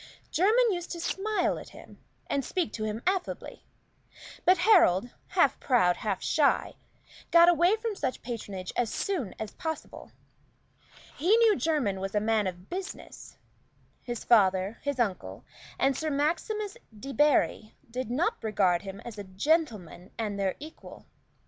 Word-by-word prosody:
Jermyn 440 +8 +3
used 350 -1 -5
to 340 - -6
smile 415 +5 -1
at - - -11
him, - - -14 0.3
and 280 - -1
speak 350 +4 -2
to 215 - -3
him 215 +2 -4
affably; 375 0 -3 0.8
but 365 +1 +6
Harold, 245 - +4 0.2
half - - +2
proud, 180 -9 +3
half - - -3
shy, - - +2 0.6
got 340 0 +7
away 350 +4 +4
from 445 -1 -4
such 265 -8 -3
patronage 205 -6 -6
as 235 -3 0
soon 335 - -2
as 220 - -5
possible; 320 -2 -6 1.1
he 360 +10 +4
knew 455 -3 +5
Jermyn 280 - 0
was 195 +2 -4
a - - +4
man 215 -1 +1
of 180 0 -7
business; 375 +2 -8 0.6
his 240 -2 -5
father, 195 -2 +3
his 285 -2 -3
uncle, 180 - -2 0.3
and 270 0 +2
Sir 315 +3 -2
Maximus 395 - -1 0.2
Debarry 275 -4 +1 0.2
did 255 -1 -4
not 275 +4 -1
regard 195 -5 +2
him 195 0 -8
as 225 -3 -9
a - - -5
gentleman 200 - -1
and 210 -3 -3
their 195 -1 0
equal. 310 +2 -11
255 Hz, 145 wpm, -28 LUFS, -, 1.1 s, got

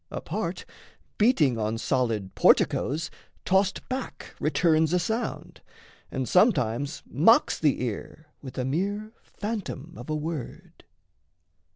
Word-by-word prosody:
A - - -4
part, - - -4 0.5
Beating 160 - +3
on 110 +1 -1
solid 115 -6 -1
porticoes, 155 +5 +3 0.3
tossed 190 +1 +1
back 260 -1 -5
Returns 160 0 +2
a - - +4
sound; 220 +7 -3 0.5
and 130 -2 -3
sometimes 145 - +2
mocks 170 - +4
the 145 -5 +2
ear 125 +6 -5 0.2
With 130 -3 -9
a 130 - -1
mere 200 +9 -2
phantom 200 -7 -5
of 125 - -10
a 155 - 0
word. 155 -4 -6
155 Hz, 115 wpm, -26 LUFS, 130-190 Hz, 0.5 s, a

